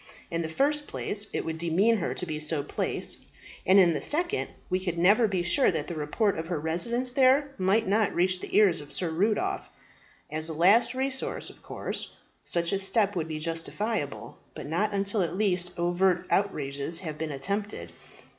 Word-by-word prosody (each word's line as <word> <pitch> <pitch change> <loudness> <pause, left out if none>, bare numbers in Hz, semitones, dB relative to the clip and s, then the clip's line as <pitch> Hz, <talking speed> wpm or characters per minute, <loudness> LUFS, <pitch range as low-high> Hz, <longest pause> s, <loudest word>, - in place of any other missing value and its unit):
In 170 0 -1
the 160 - -3
first 290 - +1
place, 205 0 +1
it - - -3
would 160 0 -4
demean 185 +8 +2
her 185 - -2
to - - -4
be 155 -3 -4
so 155 -1 -1
placed; - - -2 0.5
and 190 - +6
in 175 -4 +6
the 145 - -3
second, 345 - 0 0.2
we 185 0 0
could 175 -2 -2
never 205 +7 +5
be 185 -4 -1
sure 175 +10 +3
that - - -2
the 175 - -6
report 160 +6 0
of 165 - -5
her 175 -3 -2
residence 235 - 0
there 270 +2 +4
might 195 +4 +2
not 210 +2 +1
reach 185 +1 +2
the - - -6
ears 195 -7 +4
of 145 - -11
Sir 175 -3 -1
Rudolph. 220 - -1 0.6
As 155 +1 +1
a - - -3
last 205 +9 +4
resource, 265 0 -2
of - - -20
course - - -4 0.3
such 170 -1 -1
a 195 - 0
step 205 +1 +2
would 165 -3 -2
be 155 -1 -4
justifiable, 165 +2 -3 0.2
but - - -7
not 175 +9 0
until 200 +1 0
at 170 -1 -2
least 180 -4 +1
overt 175 +1 +1
outrages 150 -4 -1
have 155 -4 -6
been 160 -1 -3
attempted. 200 +9 -3
185 Hz, 190 wpm, -27 LUFS, 165-215 Hz, 0.6 s, and